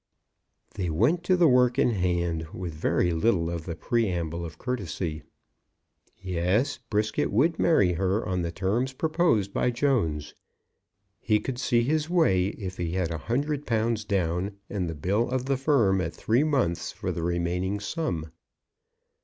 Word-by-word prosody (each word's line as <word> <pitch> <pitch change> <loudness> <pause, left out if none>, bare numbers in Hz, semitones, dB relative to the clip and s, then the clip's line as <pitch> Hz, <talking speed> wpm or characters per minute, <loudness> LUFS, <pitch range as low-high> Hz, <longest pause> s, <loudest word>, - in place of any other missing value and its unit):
They 90 -3 -2
went 120 - +2
to 185 0 +3
the 175 -2 +5
work 125 -1 +4
in 130 - +3
hand, 85 -4 -1
with 90 -3 -5
very 85 +3 +1
little 85 -1 +1
of 85 -2 -5
the 85 - -3
preamble 85 -4 -1
of 80 -1 -7
courtesy. 90 -10 -3 1.0
Yes; 95 - 0
Brisket 110 0 0
would 150 +10 +2
marry 100 - +4
her 95 +5 0
on 90 -2 -1
the 85 -1 -2
terms 110 +9 -1
proposed 155 - +1
by - - +1
Jones. 115 - 0 0.9
He 105 0 +2
could 125 +3 -5
see 120 -2 +2
his 155 +4 0
way 125 - +3
if 95 -2 -6
he 85 -1 -2
had 90 -3 -1
a 80 - -3
hundred 145 - -2
pounds 115 -1 0
down, 95 0 -1
and 95 -4 -2
the 80 - -4
bill 100 +10 0
of 130 0 -1
the 135 0 +1
Firm 125 -9 +2
at 80 -2 -4
three 120 - +2
months 125 - 0
for - - -4
the 85 - -4
remaining 90 +3 -1
sum. 90 - -3
100 Hz, 160 wpm, -27 LUFS, 85-125 Hz, 1.0 s, the